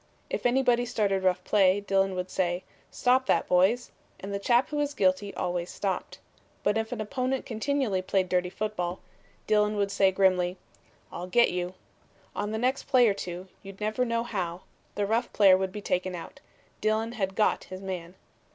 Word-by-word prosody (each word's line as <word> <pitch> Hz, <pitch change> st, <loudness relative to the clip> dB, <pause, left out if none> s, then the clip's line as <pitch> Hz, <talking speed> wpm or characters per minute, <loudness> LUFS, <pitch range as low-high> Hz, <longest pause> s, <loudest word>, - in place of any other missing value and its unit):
If -, -, +1 dB
anybody 245 Hz, -1 st, +3 dB
started 205 Hz, -5 st, 0 dB
rough 185 Hz, -1 st, +1 dB
play, 195 Hz, -1 st, +4 dB
Dillon 195 Hz, -1 st, +1 dB
would 180 Hz, 0 st, -4 dB
say: 180 Hz, -1 st, -1 dB, 0.3 s
"Stop 255 Hz, +1 st, +2 dB
that, -, -, +2 dB
boys!" 190 Hz, +7 st, +3 dB, 0.3 s
and 200 Hz, +1 st, -6 dB
the 200 Hz, -, -1 dB
chap 240 Hz, +5 st, +3 dB
who 300 Hz, -, -3 dB
was 290 Hz, 0 st, -1 dB
guilty 190 Hz, 0 st, +1 dB
always 175 Hz, 0 st, -2 dB
stopped. 190 Hz, -3 st, -3 dB, 0.5 s
But 205 Hz, -, +2 dB
if 225 Hz, 0 st, -1 dB
an 245 Hz, -, -4 dB
opponent 255 Hz, +4 st, -2 dB
continually 230 Hz, -4 st, -1 dB
played 185 Hz, 0 st, 0 dB
dirty 180 Hz, 0 st, +1 dB
football, 185 Hz, -3 st, -3 dB, 0.5 s
Dillon 210 Hz, 0 st, +2 dB
would 200 Hz, -1 st, 0 dB
say 195 Hz, -1 st, +4 dB
grimly: 185 Hz, -1 st, +2 dB, 0.5 s
"I'll 180 Hz, -, -6 dB
get 235 Hz, +6 st, +4 dB
you!" 180 Hz, +1 st, -3 dB, 0.6 s
On 205 Hz, -, -2 dB
the 220 Hz, -, -2 dB
next 255 Hz, +4 st, 0 dB
play 255 Hz, -3 st, +5 dB
or 205 Hz, -, +3 dB
two, 180 Hz, -1 st, -6 dB
you'd 195 Hz, 0 st, -11 dB
never 215 Hz, +4 st, 0 dB
know 230 Hz, -1 st, 0 dB
how, 185 Hz, -7 st, -3 dB, 0.3 s
the 205 Hz, -, 0 dB
rough 225 Hz, +4 st, 0 dB
player 195 Hz, -3 st, +7 dB
would 190 Hz, 0 st, -1 dB
be 210 Hz, +1 st, -7 dB
taken 180 Hz, -1 st, -1 dB
out. 170 Hz, -, -9 dB, 0.4 s
Dillon 220 Hz, +1 st, +1 dB
had 195 Hz, -5 st, -3 dB
"got" 215 Hz, -, +1 dB
his 185 Hz, +1 st, -9 dB
man. 180 Hz, -2 st, -5 dB
200 Hz, 180 wpm, -28 LUFS, 185-230 Hz, 0.6 s, player